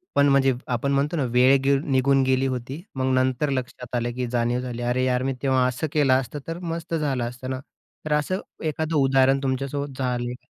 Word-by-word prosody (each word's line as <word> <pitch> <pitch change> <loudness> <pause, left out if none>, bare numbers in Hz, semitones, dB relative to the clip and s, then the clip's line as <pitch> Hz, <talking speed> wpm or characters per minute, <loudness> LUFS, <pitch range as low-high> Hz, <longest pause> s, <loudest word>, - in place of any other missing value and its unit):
पण 140 0 +5
म्हणजे 135 -1 +4 0.2
आपण 140 +4 -1
म्हणतो 145 +4 +1
ना, 145 - +1
वेळ 125 +2 +5
गे 140 0 +4
निघून 135 0 +3
गेली 130 0 +2
होती, 130 +4 -4
मग 130 0 0
नंतर 130 +2 +1
लक्षात 125 -2 -4
आलं, 120 0 -1
की 125 0 -3
जाणीव 120 0 +1
झाली 125 -1 -5
अरे, 125 +1 +1
यार 125 0 +1
मी 135 0 0
तेव्हा 130 -2 +3
असं 130 +5 -2
केलं 145 -4 +4
असतं, 140 +3 -7
तर 165 +1 -4
मस्त 170 -1 -5
झालं 140 -6 -1
असतं 125 +1 -8
ना. 130 - -3 0.5
तर 155 - 0
असं 150 +6 0 0.2
एखादं 160 +1 -1
उदाहरण 135 0 +4
तुमच्यासोबत 135 +1 -2
झालं 125 -1 -1
का? 125 - -15
130 Hz, 205 wpm, -24 LUFS, 125-140 Hz, 0.5 s, पण